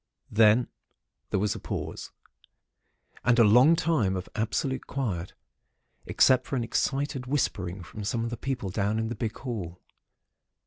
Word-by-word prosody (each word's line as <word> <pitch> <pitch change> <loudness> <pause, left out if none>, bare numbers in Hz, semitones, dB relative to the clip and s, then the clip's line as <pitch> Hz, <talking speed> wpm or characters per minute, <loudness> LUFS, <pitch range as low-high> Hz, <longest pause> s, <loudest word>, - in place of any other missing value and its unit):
"Then 110 +2 +5 0.6
there - - 0
was 105 +1 +1
a - - -7
pause, - - -5 1.1
and 120 -1 +3
a 115 - +7
long 125 +10 +6
time 155 - +1
of 90 - -6
absolute 130 +4 -2
quiet, 100 -10 -3 0.7
except 130 -1 +4
for - - -2
an 120 - 0
excited 135 +3 -1
whispering 100 -9 -1
from 105 +5 -8
some 115 +2 -1
of 115 - -3
the - - -2
people 125 -8 -3
down 105 +2 0
in 110 0 -1
the 120 - -4
big 110 -3 -4
hall. 95 -9 -5
115 Hz, 150 wpm, -27 LUFS, 100-130 Hz, 1.1 s, a